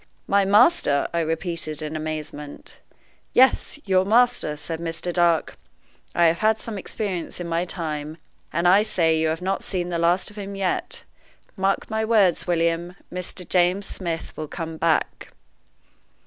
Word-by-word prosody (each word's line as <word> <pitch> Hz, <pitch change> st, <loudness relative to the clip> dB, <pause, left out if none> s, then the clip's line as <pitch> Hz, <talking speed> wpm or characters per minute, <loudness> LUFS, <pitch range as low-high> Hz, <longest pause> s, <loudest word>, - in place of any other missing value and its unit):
"My 200 Hz, 0 st, +3 dB
master!" 205 Hz, -, +4 dB
I 170 Hz, -, +1 dB
repeated, 165 Hz, -1 st, -2 dB
in 155 Hz, +1 st, -5 dB
amazement. 155 Hz, -2 st, -5 dB, 0.5 s
"Yes, 260 Hz, +3 st, +4 dB
your 185 Hz, -2 st, +3 dB
master!" 230 Hz, -7 st, +3 dB
says 160 Hz, +2 st, -5 dB
Mr. 170 Hz, +1 st, -3 dB
Dark. 170 Hz, -2 st, +2 dB, 0.6 s
"I 170 Hz, -, +4 dB
have 165 Hz, +1 st, +3 dB
had 220 Hz, 0 st, +3 dB
some 220 Hz, 0 st, -6 dB
experience 185 Hz, -4 st, -4 dB
in 175 Hz, -, -4 dB
my 170 Hz, +1 st, 0 dB
time, 155 Hz, -3 st, -4 dB, 0.3 s
and 170 Hz, +2 st, +1 dB
I 190 Hz, +3 st, +6 dB
say 165 Hz, -7 st, +1 dB
you 160 Hz, -, +2 dB
have 160 Hz, +2 st, -2 dB
not 195 Hz, +1 st, -1 dB
seen 180 Hz, -2 st, -3 dB
the 170 Hz, -1 st, -2 dB
last 175 Hz, +4 st, +2 dB
of 210 Hz, -, -10 dB
him 200 Hz, 0 st, -6 dB
yet. 195 Hz, -2 st, -2 dB, 0.5 s
Mark 195 Hz, -1 st, 0 dB
my 220 Hz, 0 st, 0 dB
words, 210 Hz, -7 st, +3 dB
William, 170 Hz, +1 st, 0 dB, 0.2 s
Mr. 180 Hz, 0 st, -5 dB
James 180 Hz, +2 st, +2 dB
Smith 170 Hz, -5 st, -5 dB
will 155 Hz, -, -5 dB
come 165 Hz, 0 st, -6 dB
back." 160 Hz, 0 st, 0 dB
175 Hz, 155 wpm, -23 LUFS, 160-195 Hz, 0.6 s, I